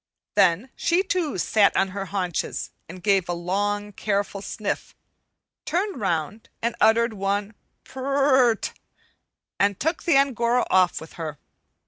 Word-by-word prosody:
Then 195 +5 +3
she 350 +3 +2
too 355 - -1
sat 200 +3 +3
on 195 - +2
her 195 +1 -4
haunches 185 -4 -3 0.2
and 180 +1 -10
gave 195 -3 +2
a - - +1
long, 205 +4 -1
careful 200 -1 -2
sniff, 205 0 -4 0.7
turned 385 - -2
round 175 +3 -2
and 235 +1 -1
uttered 230 +1 +4
one 200 +1 -2 0.3
"purr 265 -2 +2
t - - -5
t," - - -29 0.8
and 200 -1 +2
took 320 +4 -1
the 330 -6 +3
Angora 250 -3 +2
off 185 -1 +3
with 160 - -11
her. 155 -2 -4
205 Hz, 140 wpm, -24 LUFS, 190-255 Hz, 0.8 s, uttered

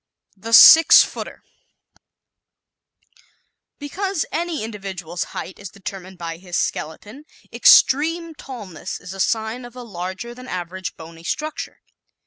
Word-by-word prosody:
The 225 +3 -8
"Six 325 +7 +9
Footer" - - -8 0.5
¶ - - -29 1.8
Because 370 +4 -3
any 335 -6 -3
individual's 190 -6 -6
height 185 - -8
is 200 -2 -8
determined 190 -1 -9
by 165 -1 -6
his 180 0 -5
skeleton, 210 - -4 0.3
extreme 330 +4 +4
tallness 215 - -8
is 180 - -9
a 195 - -10
sign 220 +4 -1
of 240 0 -12
a 250 - -8
larger 190 +2 -6
than 255 +1 -12
average 180 +1 -6
bony 165 0 -12
structure. 305 - -5
210 Hz, 120 wpm, -21 LUFS, 180-270 Hz, 1.8 s, Six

